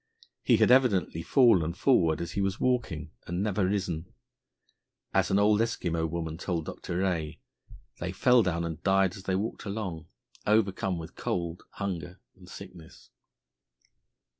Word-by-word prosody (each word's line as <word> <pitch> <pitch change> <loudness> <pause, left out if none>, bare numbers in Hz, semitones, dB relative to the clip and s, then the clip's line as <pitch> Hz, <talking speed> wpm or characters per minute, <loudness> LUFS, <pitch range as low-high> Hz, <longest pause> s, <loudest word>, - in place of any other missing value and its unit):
He - - +4
had - - +4
evidently 105 -10 +3
fallen 95 - +4
forward 85 - +2
as 85 - -4
he 100 - -2
was 95 +1 -1
walking, 100 -12 -1 0.2
and 90 +3 -2
never 100 -2 +1
risen. 90 -4 -2 1.0
As - - +2
an 95 - +3
old 105 +1 +4
Eskimo 85 -8 -1
woman 80 0 -4
told 85 -4 -2
Dr. 85 - -5
Rae, 85 -5 -1 0.6
"they 90 +1 -3
fell 125 +5 +4
down 85 -4 -1
and 80 -2 -5
died 95 -1 +2
as 95 - -11
they 95 - 0
walked 110 +4 -3
along," 95 -6 -4 0.4
overcome 100 -3 +2
with 80 -1 -8
cold, 85 -1 -3
hunger, 90 -3 -5 0.2
and - - -16
sickness. 80 -3 -12
90 Hz, 145 wpm, -28 LUFS, 85-100 Hz, 1.0 s, He